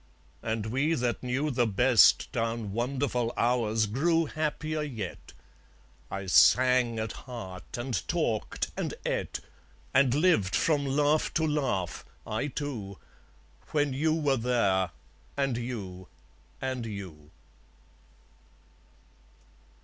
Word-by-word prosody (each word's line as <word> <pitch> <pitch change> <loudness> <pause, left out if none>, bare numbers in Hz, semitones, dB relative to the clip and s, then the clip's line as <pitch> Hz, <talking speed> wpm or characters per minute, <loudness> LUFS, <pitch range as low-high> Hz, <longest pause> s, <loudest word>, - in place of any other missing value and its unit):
And 110 -1 -2
we 135 +8 +1
that 120 -3 -1
knew 135 +4 -1
the 120 -2 +2
best 120 +3 +5
Down 115 -3 -2
wonderful 125 +1 -1
hours 115 -2 +2
grew 165 +10 +2
happier 155 0 -2
yet. 115 -11 -6 0.8
I 100 0 -4
sang 125 +4 +5
at 110 0 -2
heart, 115 -8 -8
and 120 -5 -3
talked, 155 -11 -1
and - - -3
eat, - - -2 0.5
And 130 -1 +4
lived 145 - +3
from 145 -3 +2
laugh 145 +3 +2
to 160 - +2
laugh, 130 - -1 0.2
I 110 +6 -2
too, 125 -10 -5 0.8
When 145 -3 +2
you 155 +4 +1
were 145 -4 +1
there, 115 -6 +1 0.5
and 135 -3 +1
you, 100 -7 -5 0.5
and 130 -2 -3
you. 90 -8 -8
125 Hz, 110 wpm, -29 LUFS, 110-145 Hz, 0.8 s, best